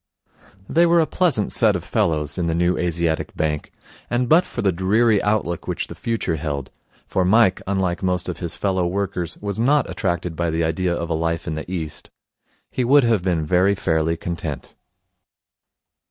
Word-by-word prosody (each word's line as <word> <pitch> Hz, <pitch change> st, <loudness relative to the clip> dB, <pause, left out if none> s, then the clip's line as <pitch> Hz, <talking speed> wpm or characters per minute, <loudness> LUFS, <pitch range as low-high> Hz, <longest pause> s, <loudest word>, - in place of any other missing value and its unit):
They 170 Hz, +2 st, +4 dB
were 170 Hz, 0 st, +4 dB
a 160 Hz, -, +4 dB
pleasant 150 Hz, -, +1 dB
set -, -, +4 dB
of -, -, -3 dB
fellows 75 Hz, 0 st, -1 dB
in 85 Hz, -, 0 dB
the 80 Hz, -, 0 dB
New 85 Hz, +1 st, +2 dB
Asiatic 85 Hz, -2 st, -1 dB
Bank, 75 Hz, -1 st, -2 dB, 0.4 s
and 120 Hz, +1 st, 0 dB
but 170 Hz, +6 st, +4 dB
for -, -, -4 dB
the 100 Hz, -, +3 dB
dreary 105 Hz, +5 st, +2 dB
outlook 105 Hz, -5 st, -1 dB
which -, -, -3 dB
the -, -, -6 dB
future 110 Hz, -8 st, -2 dB
held 75 Hz, -3 st, -4 dB, 0.3 s
for 95 Hz, -, 0 dB
Mike, 105 Hz, +1 st, +4 dB
unlike 95 Hz, -2 st, -1 dB
most 90 Hz, -1 st, -1 dB
of -, -, -4 dB
his 85 Hz, -2 st, -4 dB
follow 95 Hz, -3 st, 0 dB
workers, 95 Hz, -2 st, -3 dB
was 100 Hz, +1 st, -4 dB
not 140 Hz, +5 st, +3 dB
attracted 85 Hz, -3 st, -2 dB
by 85 Hz, +1 st, -1 dB
the 80 Hz, +1 st, 0 dB
idea 85 Hz, +3 st, 0 dB
of 85 Hz, 0 st, -4 dB
a -, -, +2 dB
life 80 Hz, 0 st, -1 dB
in 80 Hz, -, -3 dB
the 80 Hz, +3 st, -6 dB
East 80 Hz, -5 st, -5 dB, 0.6 s
he 130 Hz, -, -1 dB
would 140 Hz, +3 st, +5 dB
have 115 Hz, -5 st, +2 dB
been 85 Hz, -4 st, 0 dB
very 95 Hz, +5 st, +3 dB
fairly 80 Hz, -3 st, 0 dB
content. 80 Hz, -5 st, -5 dB
90 Hz, 185 wpm, -22 LUFS, 80-105 Hz, 0.6 s, would